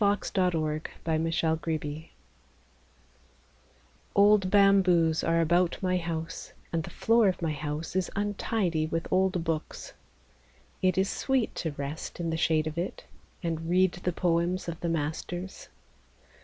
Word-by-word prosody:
_ - - +4
ANNAM 180 -6 +1 0.2
THE 160 0 0
BAMBOO 160 -1 +1
GARDEN 155 -1 -4 2.1
Old 200 -1 +5
bamboos 185 -5 +4
are 165 0 +2
about 175 +2 +2
my 185 0 +2
house, 165 -1 -5 0.2
And 165 - +1
the - - -7
floor 230 -1 +3
of 185 - 0
my 165 -3 -1
house 150 +3 -4
is 185 -2 0
untidy 200 -5 0
with 165 +1 -2
old 185 -2 +2
books. 160 -2 -4 0.9
It 185 -2 +2
is 190 +1 +3
sweet 265 +2 0
to 160 -3 -2
rest 145 +5 -6
in 165 -1 -1
the - - 0
shade 160 -1 +2
of 155 +1 -3
it 175 - -4 0.4
And 165 -1 -3
read 185 +1 +4
the 180 0 -3
poems 175 +1 0
of 165 -1 -5
the 170 - -2
masters. 165 +4 -4
170 Hz, 140 wpm, -28 LUFS, 160-185 Hz, 2.1 s, Old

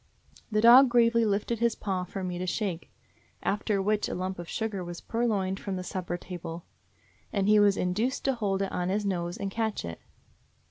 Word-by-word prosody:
The 215 0 +2
dog 245 +3 +8
gravely 230 -1 +4
lifted 210 +2 0
his 235 -1 +2
paw 185 -3 -2
for 190 +1 -6
me 180 -1 -3
to 185 - -3
shake; 180 -2 -3 0.5
after 205 0 0
which 210 +2 0
a - - -3
lump 185 0 -3
of 175 - -7
sugar 215 -4 -3
was 175 -1 -7
pur 235 +1 -1
loined 195 -3 -1
from 195 -2 -4
the 185 - -4
supper 180 -1 -4
table, 175 -2 -7 0.7
and 200 -1 0
he 210 0 +6
was 205 -1 +4
induced 210 +9 -1
to 270 - +3
hold 200 -5 -1
it 195 - -3
on 180 0 -1
his 205 +2 0
nose 175 -3 -2
and 195 -1 -3
catch 220 - -2
it. 85 -1 -7
195 Hz, 200 wpm, -28 LUFS, 180-220 Hz, 0.7 s, dog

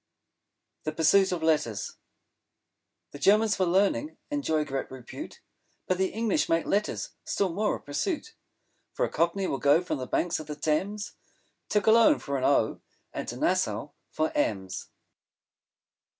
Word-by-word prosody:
THE 155 - -3
PURSUIT 190 +5 +4
OF 175 -3 -2
LETTERS 150 -10 0 1.1
The 145 - -9
Germans 210 +3 +4
for 185 - +1
Learning 200 - +1
enjoy 160 - 0
great 135 -2 -3
repute; 130 -2 -9 0.4
But 185 0 0
the 190 - +3
English 225 0 0
make 165 0 +2
Letters 205 +1 -1
still 190 -4 -1
more 210 +3 +1
a - - -7
pursuit; 335 - -3 0.6
For - - +1
a - - -4
Cockney 170 +4 +1
will 135 - -2
go 145 +2 +5
from 180 - -3
the 130 - -4
banks 175 +5 0
of 155 - -8
the 150 - -5
Thames 190 +8 -1 0.6
To 210 - +3
Cologne 230 +8 +6
for 140 - -4
an 130 - -1
O 130 -6 +2 0.3
and - - -4
to - - -5
Nassau - - 0 0.2
for 155 0 -1
M's. 95 -3 -1
170 Hz, 150 wpm, -28 LUFS, 150-205 Hz, 1.1 s, Cologne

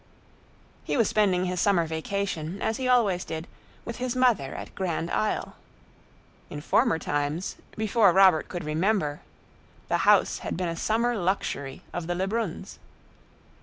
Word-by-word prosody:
He - - -1
was 230 -4 +3
spending 190 -4 +2
his 180 -1 -1
summer 190 -5 +3
vacation, 165 +1 -3
as 220 - -1
he 260 - -2
always 215 -8 +3
did, 160 +1 -6 0.4
with 235 - -5
his 250 0 -2
mother 240 - +2
at - - -8
Grand 170 -3 -2
Isle. 215 - -1 0.9
In 145 - -6
former 220 - +2
times, 145 +3 -2 0.2
before 220 -2 +4
Robert 185 -3 +5
could 175 -1 -5
remember, 155 -1 0 0.7
"the - - +2
house" - - +3
had - - -4
been 180 -1 -1
a 165 - -3
summer 230 +7 0
luxury 175 -8 -2
of 175 -2 -4
the 175 - -1
Lebruns. 195 0 -3
185 Hz, 145 wpm, -26 LUFS, 165-215 Hz, 0.9 s, Robert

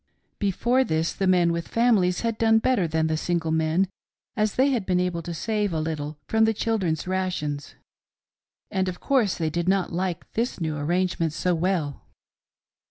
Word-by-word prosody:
Before 235 +6 +2
this, 160 -7 0
the 195 - -1
men 175 -2 +4
with 170 0 -3
families 210 -7 +2
had 230 -1 -2
done 225 -1 +5
better 225 -6 +2
than 160 0 0
the 160 0 0
single 165 0 -1
men, 160 +4 +2 0.5
as 215 -1 0
they 270 +2 +3
had 240 -6 0
been 180 -1 +1
able 180 -2 -1
to 170 - -6
save 210 +2 -1
a 160 - 0
little 155 -1 -3
from 220 0 +3
the 220 0 +1
children's 190 -9 -1
rations, 180 -6 -2 1.0
and 190 0 0
of 175 - -7
course 245 -9 +1
they 160 -2 -1
did 170 +2 -1
not 190 -3 +1
like 180 0 -3
this 235 -1 -1
new 160 -2 -2
arrangement 170 +1 0
so 180 +2 0
well. 165 -4 -1
180 Hz, 175 wpm, -25 LUFS, 160-210 Hz, 1.0 s, done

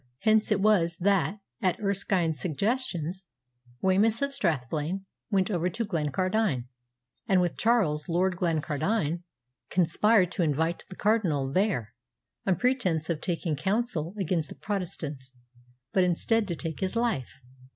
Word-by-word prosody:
Hence 220 0 +3
it 205 - +3
was 175 -5 +3
that, 195 0 +1 0.2
at 185 +1 +1
Erskine's 190 -6 0
suggestion, 180 - -1 0.7
Wemyss 215 +6 +3
of 280 0 -1
Strathblane 160 - -1 0.2
went 195 -1 +1
over 175 -1 +1
to 230 +6 -3
Glencardine, 185 - 0 0.6
and 190 -3 +4
with 175 -2 +1
Charles, 180 -11 +1
Lord 180 +2 +2
Glencardine, 165 +1 0 0.5
conspired 185 +2 +3
to 185 - -2
invite 160 +2 0
the 185 - -9
Cardinal 175 -12 +1
there, 155 - 0 0.5
on 190 - +4
pretence 185 - +1
of 155 - -3
taking 170 -3 -1
counsel 190 - -1
against 175 -5 -1
the - - -9
Protestants, 150 -9 -5 0.6
but 190 - +4
instead 205 +5 +2
to 170 - -2
take 160 -2 -4
his 190 +3 -2
life. 230 - -1
180 Hz, 130 wpm, -28 LUFS, 160-210 Hz, 0.7 s, and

